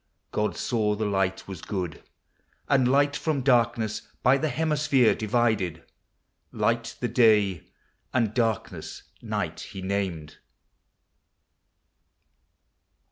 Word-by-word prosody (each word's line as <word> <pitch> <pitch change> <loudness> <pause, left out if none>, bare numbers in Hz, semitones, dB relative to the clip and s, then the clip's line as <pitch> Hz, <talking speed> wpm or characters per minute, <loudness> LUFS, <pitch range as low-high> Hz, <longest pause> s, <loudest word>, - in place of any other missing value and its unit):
God 105 0 -1
saw 105 -3 0
the 110 +1 -2
light 95 -2 -1
wa? 95 - -6
good; 90 -6 -4 0.7
And 135 -3 +3
light 140 +2 +3
from 155 -3 -1
darkness 115 -4 +2 0.2
by 135 +2 +5
the 155 - 0
hemisphere 145 -4 +2
Divided: 105 -7 0 0.7
light 115 0 -1
the 120 - +1
Day, 105 - +3 0.4
and 115 -4 +1
darkness 115 -2 -2 0.2
Xight, - - -3
He 95 - -8
named. 95 -6 -3
110 Hz, 100 wpm, -26 LUFS, 100-125 Hz, 0.7 s, by